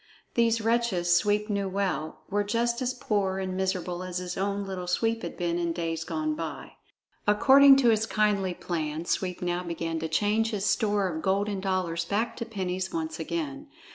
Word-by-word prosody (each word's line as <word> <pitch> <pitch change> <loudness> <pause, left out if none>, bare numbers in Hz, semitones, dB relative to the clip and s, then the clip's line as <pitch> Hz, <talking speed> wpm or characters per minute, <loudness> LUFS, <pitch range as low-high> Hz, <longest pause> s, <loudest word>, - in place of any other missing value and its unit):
These 230 -1 +2
wretches, 220 -7 +2
Sweep 210 +3 +2
knew 200 -2 -1
well, 185 -6 -2
were 205 +1 0
just 235 +3 0
as 255 0 0
poor 200 -5 0
and 190 -1 -3
miserable 185 -2 -2
as 185 -1 -4
his 180 0 -4
own 200 +1 -1
Little 185 -2 -5
Sweep 225 +5 0
had - - -6
been 175 -1 -1
in 170 -1 -1
days 165 -1 -2
gone 310 - -2
by. 305 - -6 0.6
According 270 +6 +7
to 265 -3 +4
his 220 0 +2
kindly 205 -4 +1
plan, 160 -2 -3
Sweep 180 0 -2
now 175 0 0
began 165 -1 -3
to 160 - -2
change 210 +7 +1
his 205 -3 -2
store 205 0 +2
of 160 -3 -4
golden 200 +2 0
dollars 185 -3 -1
back 205 +7 -1
to 230 - -3
pennies 185 -3 -3
once 320 -1 -3
again. 295 -3 -4
195 Hz, 180 wpm, -27 LUFS, 180-225 Hz, 0.6 s, According